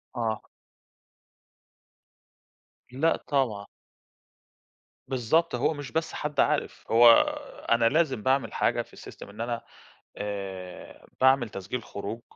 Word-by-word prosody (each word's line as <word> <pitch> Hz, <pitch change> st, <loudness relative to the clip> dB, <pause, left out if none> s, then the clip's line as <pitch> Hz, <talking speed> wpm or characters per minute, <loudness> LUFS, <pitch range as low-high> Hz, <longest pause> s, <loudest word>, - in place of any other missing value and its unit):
آه. 110 Hz, -3 st, -2 dB, 2.5 s
لأ 155 Hz, +6 st, +2 dB
طبعّا. 120 Hz, -8 st, 0 dB, 1.4 s
بالضبط، 135 Hz, +6 st, +1 dB
هو 125 Hz, +6 st, +1 dB
مش 145 Hz, -2 st, -8 dB
بس 160 Hz, 0 st, -2 dB
حد 150 Hz, -2 st, -4 dB
عارِف، -, -, +1 dB
هو 115 Hz, +1 st, +9 dB, 0.6 s
أنا 115 Hz, 0 st, +4 dB
لازم 135 Hz, -7 st, +1 dB
باعمل 135 Hz, 0 st, +1 dB
حاجة -, -, +1 dB
في -, -, -14 dB
الsystem -, -, -11 dB
إن 105 Hz, +3 st, -9 dB
أنا 120 Hz, 0 st, -2 dB, 0.6 s
آآ، 95 Hz, -3 st, -7 dB
باعمل 130 Hz, -3 st, +4 dB
تسجيل 100 Hz, +5 st, -5 dB
خروج، 105 Hz, +3 st, -6 dB
120 Hz, 105 wpm, -27 LUFS, 105-135 Hz, 2.5 s, هو